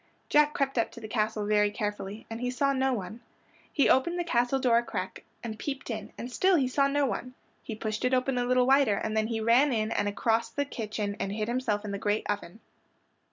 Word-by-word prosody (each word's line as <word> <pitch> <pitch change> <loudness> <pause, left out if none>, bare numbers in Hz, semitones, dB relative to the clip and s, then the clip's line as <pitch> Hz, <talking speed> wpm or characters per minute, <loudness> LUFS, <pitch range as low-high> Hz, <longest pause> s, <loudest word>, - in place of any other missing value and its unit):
Jack 300 0 +4
crept 270 -3 0
up 230 - +1
to - - -11
the 220 - -7
castle 215 -1 -1
very 210 0 +3
carefully, 205 0 -4
and 225 +1 -6
he 250 - -1
saw 275 +2 +1
no 265 0 +1
one. 215 -1 -4 0.5
He 285 - +3
opened 340 +7 +3
the 350 - 0
castle 245 -5 +1
door 245 -3 +4
a - - -3
crack 190 -5 -5 0.2
and 220 -2 -6
peeped 270 -3 -4
in, 225 - -5
and 245 - -6
still 375 +8 +3
he 275 -6 +2
saw 275 +2 +2
no 285 0 +1
one. 255 0 -4 0.3
He 220 - -6
pushed 215 +1 -4
it 250 - +2
open 255 0 +1
a 245 - 0
little 250 0 +3
wider 265 -5 +4
and 215 +2 -3
then 220 0 +1
he 225 -1 -2
ran 240 +6 +4
in 220 -2 0
and 205 - 0
across 225 +3 0
the 285 - -2
kitchen 215 -5 -4
and 195 - -2
hid 215 0 -2
himself 235 -4 -1
in 205 - -4
the 200 - -3
great 205 +1 0
oven. 205 0 -4
235 Hz, 235 wpm, -28 LUFS, 215-265 Hz, 0.5 s, Jack